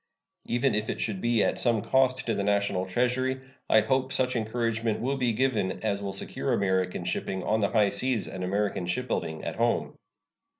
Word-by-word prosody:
Even 120 Hz, +3 st, +1 dB
if 105 Hz, +1 st, -1 dB
it -, -, -3 dB
should 100 Hz, -4 st, -2 dB
be 120 Hz, -1 st, +2 dB
at -, -, 0 dB
some 115 Hz, -4 st, +2 dB
cost 130 Hz, -1 st, +2 dB
to 115 Hz, -, 0 dB
the 100 Hz, -, -1 dB
National 100 Hz, -2 st, +1 dB
Treasury, 125 Hz, +5 st, 0 dB, 0.3 s
I 110 Hz, -, +6 dB
hope 130 Hz, +2 st, 0 dB
such 125 Hz, -1 st, +1 dB
encouragement 115 Hz, -1 st, -1 dB
will 135 Hz, +4 st, 0 dB
be 125 Hz, -3 st, +1 dB
given 110 Hz, -6 st, 0 dB
as 100 Hz, -2 st, 0 dB
will 100 Hz, -1 st, -3 dB
secure 95 Hz, -, -2 dB
American 95 Hz, -2 st, 0 dB
shipping 95 Hz, -1 st, -2 dB
on 110 Hz, +1 st, +1 dB
the 100 Hz, -, +1 dB
high 105 Hz, -3 st, +3 dB
seas 125 Hz, 0 st, 0 dB
and 95 Hz, -, -5 dB
American 100 Hz, -1 st, -1 dB
shipbuilding 90 Hz, -6 st, -2 dB
at -, -, -4 dB
home. -, -, +1 dB
110 Hz, 185 wpm, -28 LUFS, 100-125 Hz, 0.3 s, I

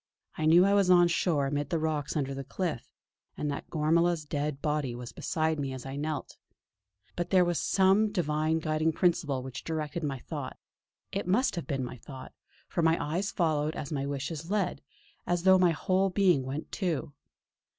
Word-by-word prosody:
I 155 Hz, -, 0 dB
knew 175 Hz, +3 st, +7 dB
I 200 Hz, -, +3 dB
was 200 Hz, -2 st, +3 dB
on 175 Hz, -1 st, +7 dB
shore 165 Hz, -4 st, +1 dB
amid 145 Hz, +1 st, -2 dB
the 170 Hz, -, +1 dB
rocks 155 Hz, -2 st, -2 dB
under 135 Hz, -2 st, -1 dB
the 135 Hz, 0 st, -5 dB
cliff, 155 Hz, 0 st, -4 dB, 0.5 s
and 150 Hz, -, -1 dB
that 140 Hz, -, -6 dB
Gormala's 165 Hz, +1 st, +2 dB
dead 145 Hz, -1 st, -2 dB
body 150 Hz, -5 st, -1 dB
was 120 Hz, 0 st, -7 dB
beside 160 Hz, -2 st, -1 dB
me 135 Hz, -2 st, -2 dB
as 130 Hz, -1 st, -7 dB
I 135 Hz, 0 st, -5 dB
knelt. 150 Hz, +1 st, -4 dB, 0.8 s
But 175 Hz, -, -2 dB
there 185 Hz, -2 st, +5 dB
was 175 Hz, -3 st, 0 dB
some 195 Hz, +2 st, +3 dB
divine 155 Hz, -4 st, 0 dB
guiding 155 Hz, 0 st, 0 dB
principle 150 Hz, -7 st, +1 dB
which 130 Hz, -1 st, -7 dB
directed 160 Hz, 0 st, -3 dB
my 140 Hz, -2 st, -2 dB
thought -, -, -6 dB, 0.5 s
it -, -, -3 dB
must 215 Hz, +7 st, +2 dB
have 170 Hz, -, -5 dB
been 135 Hz, -4 st, -1 dB
my 125 Hz, +1 st, -6 dB
thought, 130 Hz, +2 st, -10 dB, 0.3 s
for -, -, -1 dB
my 165 Hz, 0 st, +4 dB
eyes 175 Hz, +7 st, -1 dB
followed 155 Hz, -3 st, 0 dB
as 140 Hz, -, -5 dB
my 140 Hz, -2 st, -2 dB
wishes 145 Hz, +4 st, -4 dB
led, 200 Hz, -3 st, 0 dB, 0.5 s
as 175 Hz, -1 st, 0 dB
though 190 Hz, 0 st, +6 dB
my 180 Hz, -1 st, +5 dB
whole 185 Hz, +4 st, +1 dB
being 180 Hz, -8 st, +3 dB
went 140 Hz, +4 st, -5 dB
too. 165 Hz, -7 st, -2 dB
155 Hz, 185 wpm, -29 LUFS, 145-175 Hz, 0.8 s, knew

